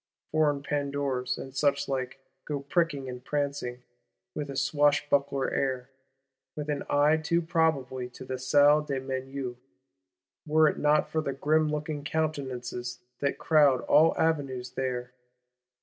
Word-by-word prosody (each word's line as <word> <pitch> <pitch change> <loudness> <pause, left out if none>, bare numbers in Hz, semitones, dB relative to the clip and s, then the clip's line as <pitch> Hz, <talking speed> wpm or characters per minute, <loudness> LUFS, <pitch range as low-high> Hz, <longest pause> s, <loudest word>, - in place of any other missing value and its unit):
Foreign 150 -2 +2
Pandours, 140 -3 -1
and 135 - -8
suchlike, 135 -2 0 0.3
go 145 -2 -3
pricking 145 -2 0
and 125 -1 -7
prancing, 140 -4 -3 0.5
with 145 -1 -4
a 140 - -5
swashbuckler 140 -1 +2
air; 130 -1 -1 0.6
with 150 0 -3
an 145 -1 -2
eye 145 +2 +4
too 160 +2 +1
probably 160 -7 0
to 130 +1 -11
the 130 0 -4
Salle 145 +3 +5
des 140 -3 -3
Menus,—were 130 -1 -3
it - - -1
not 150 0 +3
for 160 - +1
the 140 -3 -3
"grim 155 +3 +2
looking 150 -1 -3
countenances" 130 -6 -3 0.2
that 140 -1 0
crowd 145 -5 +4
all 160 +2 +4
avenues 140 -6 0
there. 125 -1 -3
140 Hz, 130 wpm, -28 LUFS, 130-150 Hz, 0.6 s, Salle